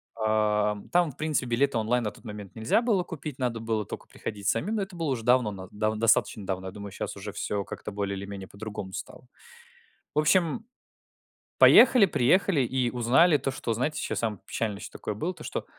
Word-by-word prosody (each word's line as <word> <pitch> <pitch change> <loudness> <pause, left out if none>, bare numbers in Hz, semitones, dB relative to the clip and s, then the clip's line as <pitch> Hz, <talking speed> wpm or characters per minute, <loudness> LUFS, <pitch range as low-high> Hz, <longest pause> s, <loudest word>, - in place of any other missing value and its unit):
Ам, 105 -2 +1
там, 175 -3 +3
в - - -21
принципе, 155 -4 0
билеты 120 +2 +1
онлайн 115 +2 +1
на 105 - -2
тот - - -18
момент 105 -3 -8
нельзя 110 - +2
было 220 -7 +2
купить, 150 -5 -7
надо 120 -3 -1
было 110 -1 -2
тока - - -8
приходить 100 -2 -6
самим. 165 - 0
Но 215 - 0
это 195 -1 -6
было 165 -3 -2
уже 125 -4 -2
давно, 125 -2 +3
нав 95 -2 -9
дав 110 +1 -1
достаточно 110 -2 +2
давно. 95 0 -3
Я - - -5
думаю, 100 0 -8
сейчас - - -5
уже 100 +1 -7
всё 100 0 -2
как-то 105 - -7
более 100 -1 -3
или 100 - -6
менее 100 -1 -7
по-другому 100 -2 -7
стало. - - -8 0.9
В - - +3
общем, 170 +7 +2 0.9
поехали, 250 -4 +8
приехали 180 +2 +3
и 125 0 0
узнали 130 +8 +4
то, 135 0 -2
что, 120 -3 -3
знаете, 130 +7 -1
сейчас - - -2
самое 110 -4 -2
печальное, 105 -2 -3
что - - -9
такое 105 - -4
было: 165 - -2
то, - - -12
что - - -4
115 Hz, 205 wpm, -27 LUFS, 105-150 Hz, 0.9 s, поехали